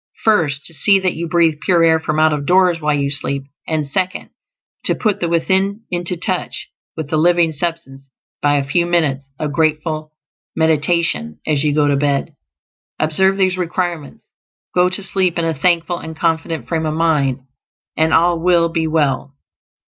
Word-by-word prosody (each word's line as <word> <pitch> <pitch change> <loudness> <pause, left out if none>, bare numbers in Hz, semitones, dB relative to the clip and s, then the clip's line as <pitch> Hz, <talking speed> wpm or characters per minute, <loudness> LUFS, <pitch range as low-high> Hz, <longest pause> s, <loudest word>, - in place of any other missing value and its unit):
First, 155 -10 +2
to 165 - -9
see 195 +7 +3
that 190 -2 0
you 170 +1 -4
breathe 165 -2 +2
pure 175 -3 +3
air 160 -1 +4
from 155 -1 -2
out 155 0 +4
of 145 -1 -3
doors 180 -2 +3
while 150 -1 +1
you 140 -1 -1
sleep; 140 -1 -3 0.2
and, 155 -2 -1
second, 185 +6 -3 0.5
to - - +1
put 210 -4 0
the 170 - -1
Within 190 +5 +1
into 175 +1 -2
touch 185 +1 -3 0.3
with 155 -2 -5
the 155 - +2
Living 170 0 +3
Substance 150 -4 -5 0.4
by 145 0 +3
a 140 - +1
few 170 +5 +1
minutes 155 -6 +1
of 150 -2 -3
grateful 155 0 -1 0.4
meditation 160 - 0
as 150 -2 0
you 150 -1 +1
go 150 -1 +3
to 140 -1 +2
bed. 140 -1 0 0.6
Observe 190 +5 +2
these 185 -1 +1
requirements, 175 -4 -3 0.5
go 180 0 +3
to 185 +2 -5
sleep 190 -2 0
in 170 - 0
a 165 - 0
thankful 170 +3 +1
and 160 0 -8
confident 160 0 -1
frame 160 -2 -1
of 155 - -2
mind, 150 -6 +1 0.5
and 160 0 +2
all 170 +1 +3
will 170 -1 +3
be 165 -1 -1
well. 145 -3 0
160 Hz, 175 wpm, -18 LUFS, 150-175 Hz, 0.6 s, air